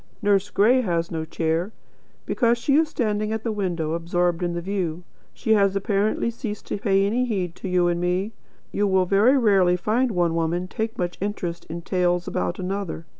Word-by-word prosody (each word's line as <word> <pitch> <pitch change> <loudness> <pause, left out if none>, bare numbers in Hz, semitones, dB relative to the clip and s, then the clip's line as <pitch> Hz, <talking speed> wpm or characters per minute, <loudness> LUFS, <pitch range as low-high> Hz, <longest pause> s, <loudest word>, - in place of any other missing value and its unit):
Nurse 200 0 +2
Gray 235 +6 +4
has 170 -6 -1
no 160 -1 -3
chair, 165 +4 -1 0.5
because 235 -1 +2
she 275 +4 0
is 315 +1 +3
standing 215 -6 -1
at 220 0 -3
the 230 - -1
window 175 -6 -2
absorbed 175 +1 0
in 175 -1 -1
the 170 - -2
view. 180 -2 -3 0.3
She 220 - 0
has 200 -2 +3
apparently 200 +3 0
ceased 225 -3 -6
to - - -2
pay 195 -1 +2
any 240 +5 +1
heed 190 -8 -2
to 190 - -5
you 180 -1 +3
and 175 0 0
me. 180 +4 0 0.4
You 205 0 +1
will 190 -1 +3
very 210 +9 +4
rarely 195 -7 +4
find 225 +8 +1
one 175 -5 +1
woman 170 +2 -1
take 220 +4 -4
much 175 -1 -3
interest 180 -4 -3
in 170 +2 -7
tales 180 -1 0
about 175 - -2
another. 190 -3 -4
190 Hz, 190 wpm, -24 LUFS, 175-215 Hz, 0.5 s, Gray